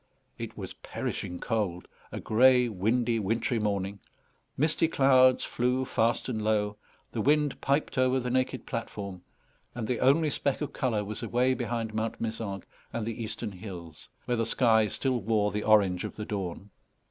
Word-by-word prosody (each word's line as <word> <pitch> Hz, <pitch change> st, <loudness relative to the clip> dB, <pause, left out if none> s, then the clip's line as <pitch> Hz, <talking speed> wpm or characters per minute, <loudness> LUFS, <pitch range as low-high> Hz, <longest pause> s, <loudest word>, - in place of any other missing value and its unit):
It -, -, -6 dB
was -, -, -6 dB
perishing 90 Hz, -, -5 dB
cold, 100 Hz, -7 st, -2 dB, 0.2 s
a -, -, -4 dB
grey, 125 Hz, +2 st, +5 dB
windy, 115 Hz, +3 st, +1 dB
wintry 115 Hz, +3 st, 0 dB
morning; 100 Hz, -1 st, -1 dB, 0.6 s
misty 155 Hz, +3 st, +2 dB
clouds 130 Hz, -4 st, +5 dB
flew 125 Hz, +2 st, 0 dB
fast 115 Hz, -1 st, +1 dB
and 115 Hz, -4 st, -2 dB
low; 105 Hz, -1 st, +1 dB, 0.3 s
the 115 Hz, -, -2 dB
wind 150 Hz, +3 st, +2 dB
piped 140 Hz, -1 st, 0 dB
over 130 Hz, +1 st, +3 dB
the 125 Hz, -1 st, -3 dB
naked 130 Hz, -1 st, 0 dB
platform; 100 Hz, -6 st, -5 dB, 0.5 s
and 115 Hz, -3 st, -3 dB
the 125 Hz, -, -1 dB
only 150 Hz, +4 st, +4 dB
speck 140 Hz, -1 st, -1 dB
of 150 Hz, -, -4 dB
colour 110 Hz, -5 st, 0 dB
was 105 Hz, 0 st, -5 dB
away 125 Hz, +2 st, +2 dB
behind 115 Hz, -3 st, -3 dB
Mount 110 Hz, +1 st, -2 dB
Mézenc 110 Hz, -4 st, -4 dB, 0.3 s
and 115 Hz, -2 st, -3 dB
the 115 Hz, +1 st, -4 dB
eastern 110 Hz, 0 st, -4 dB
hills, 90 Hz, -5 st, -10 dB, 0.2 s
where 120 Hz, -, 0 dB
the 115 Hz, -, +1 dB
sky 110 Hz, -3 st, +4 dB
still 125 Hz, +2 st, -1 dB
wore 105 Hz, 0 st, +1 dB
the 105 Hz, -, -2 dB
orange 100 Hz, -4 st, +4 dB
of -, -, -5 dB
the 105 Hz, -, -5 dB
dawn. 100 Hz, -1 st, -5 dB
115 Hz, 165 wpm, -29 LUFS, 105-130 Hz, 0.6 s, grey